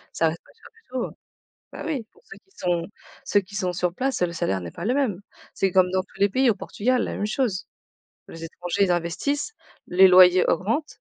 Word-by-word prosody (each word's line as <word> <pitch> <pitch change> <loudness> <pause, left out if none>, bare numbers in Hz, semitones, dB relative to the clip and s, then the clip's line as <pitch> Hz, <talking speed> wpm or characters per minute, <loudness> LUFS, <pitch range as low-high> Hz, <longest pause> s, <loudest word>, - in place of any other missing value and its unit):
Ça 165 - +3
reste 165 +1 -5
pas - - -22
cher 450 - -17
du 455 - -23
tout, 255 -2 -2
heu, - - -10 0.6
bah - - -7
oui, 275 -8 -2
pour 445 - -26
ceux - - -12
qui 385 - -38
sont 175 -2 -1 0.4
ceux 205 - +3
qui 195 +1 -15
sont 180 -2 -1
sur 175 0 -1
place, 265 -1 -1
le 170 -1 +1
salaire 95 - -1
n'est 85 -1 -7
pas 170 - -8
le 245 +4 +1
même. 230 -10 0 0.3
C'est 195 - +1
comme 185 -1 +4
dans 185 0 +1
tous 190 - -20
les 200 - +5
pays, 255 +4 +3
au - - +1
Portugal 245 +5 -1
la - - -3
même 205 - -2
chose. 215 -4 -1 0.6
Les 165 0 -10
étrangers 175 +4 -2
ils 180 - 0
investissent, 280 - -1 0.3
les 190 +2 +6
loyers 180 0 +7
augmentent 225 - -1
190 Hz, 225 wpm, -24 LUFS, 175-255 Hz, 0.6 s, loyers